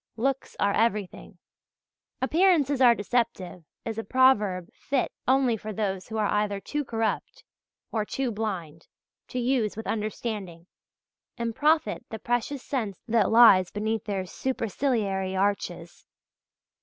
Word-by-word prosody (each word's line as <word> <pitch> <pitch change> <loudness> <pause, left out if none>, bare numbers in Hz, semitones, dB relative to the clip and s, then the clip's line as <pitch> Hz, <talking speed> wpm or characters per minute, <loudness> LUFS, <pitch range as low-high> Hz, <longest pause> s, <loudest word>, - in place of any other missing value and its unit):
Looks 270 +3 -1
are 200 0 +2
everything. 210 -4 -1 0.9
"Appearances 300 -3 +3
are 240 -2 +7
deceptive," 205 -5 -2 0.2
is 225 -1 -3
a - - -3
proverb 210 -10 +3
fit 275 -3 -1 0.2
only 260 -2 +3
for 215 0 -6
those 195 -3 -3
who 220 - -5
are 215 - +1
either 210 -1 0
too 295 +9 -3
corrupt 225 -3 -3 0.5
or 220 -2 0
too 255 +3 -2
blind 185 -8 -5 0.4
to - - -6
use 240 -4 0
with 220 - -5
understanding 210 -5 -4 0.7
and 230 -2 -3
profit 310 +3 +2
the 220 - -5
precious 245 +5 -2
sense 220 -9 -3
that 225 -3 +3
lies 220 -6 +7
beneath 220 +1 -2
their 195 -3 -2
superciliary 210 -4 -1
arches. 185 -3 -2
220 Hz, 130 wpm, -27 LUFS, 200-250 Hz, 0.9 s, are